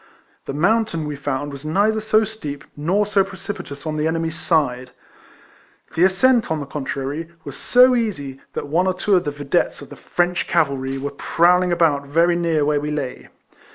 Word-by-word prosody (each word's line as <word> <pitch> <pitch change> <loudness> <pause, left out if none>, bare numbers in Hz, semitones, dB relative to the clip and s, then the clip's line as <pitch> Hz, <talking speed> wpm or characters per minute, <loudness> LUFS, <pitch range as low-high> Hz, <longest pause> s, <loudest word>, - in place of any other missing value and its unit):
The - - -4
mountain, 175 +1 +1
we 150 - -4
found, 145 0 -3
was 140 0 -9
neither 205 +8 +1
so 215 0 +3
steep 155 -10 -6
nor 180 +8 +1
so 200 -1 +3
precipitous 190 -6 -7
on 155 -1 -2
the 155 +1 +1
enemy's 165 0 -1
side. 145 -7 0 1.0
The 175 - +4
ascent, 230 +5 +3
on 160 -1 -1
the 145 - -5
contrary, 140 +3 -4
was 140 -1 -8
so 250 +1 +5
easy, 145 - -3
that - - -4
one 170 +6 +1
or 185 - +1
two 200 +2 +2
of 180 - +2
the - - 0
videttes 145 -1 -1
of - - -12
the - - -8
French 175 0 -1
cavalry 135 -5 0
were 140 +1 -4
prowling 175 +5 +2
about 150 -5 +2
very 170 +4 +3
near 165 -3 +1
where 150 0 +2
we 150 - -3
lay. 145 -4 -4
160 Hz, 185 wpm, -21 LUFS, 145-185 Hz, 1.0 s, so